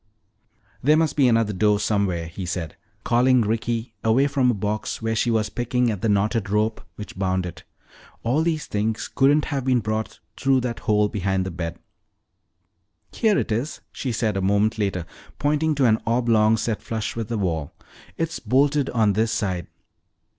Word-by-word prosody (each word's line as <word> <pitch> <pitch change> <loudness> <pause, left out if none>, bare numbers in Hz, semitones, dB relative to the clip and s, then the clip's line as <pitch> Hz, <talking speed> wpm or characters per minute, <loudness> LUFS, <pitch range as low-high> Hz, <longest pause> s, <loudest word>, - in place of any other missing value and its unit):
"There 150 +4 +4
must 160 -1 +1
be 140 -3 +4
another 115 -3 +2
door 105 +2 +2
somewhere," 100 -5 0
he 85 +4 -7
said, 85 -3 -4 0.3
calling 125 +1 +4
Ricky 115 +1 -2
away 115 +5 +3
from 135 -3 +2
a 120 - +2
box 105 +2 -3
where 115 0 -1
she 120 - +1
was 110 -2 0
picking 120 0 0
at 100 -4 -5
the 115 - +1
knotted 105 +1 +1
rope 105 +2 0
which 105 -3 -9
bound 95 -1 0
it. 90 - -8 0.6
"All 125 +7 +1
these 160 -2 -1
things 110 +1 -2
couldn't 145 +2 +3
have 140 -4 -2
been 130 -1 +2
brought 110 0 -3 0.2
through 135 -1 +2
that 120 -2 -3
hole 105 -1 +2
behind 95 -2 -1
the 95 - -4
bed." 85 -1 -5 1.3
"Here 215 -3 +2
it - - -1
is," 120 +8 -2
she 130 - -3
said 110 -2 -1
a - - -1
moment 105 +4 +1
later, 95 -4 -1 0.3
pointing 150 +2 +1
to 135 -2 +2
an 110 -2 +3
oblong 115 -2 +3
set 110 -1 -2
flush 110 -2 -4
with 115 -2 -3
the 115 -1 -2
wall. 80 -7 -2 0.5
"It's 165 0 -2
bolted 140 +2 +2
on 110 -4 +2
this 110 +3 +1
side." 90 -7 -2
110 Hz, 175 wpm, -23 LUFS, 100-125 Hz, 1.3 s, There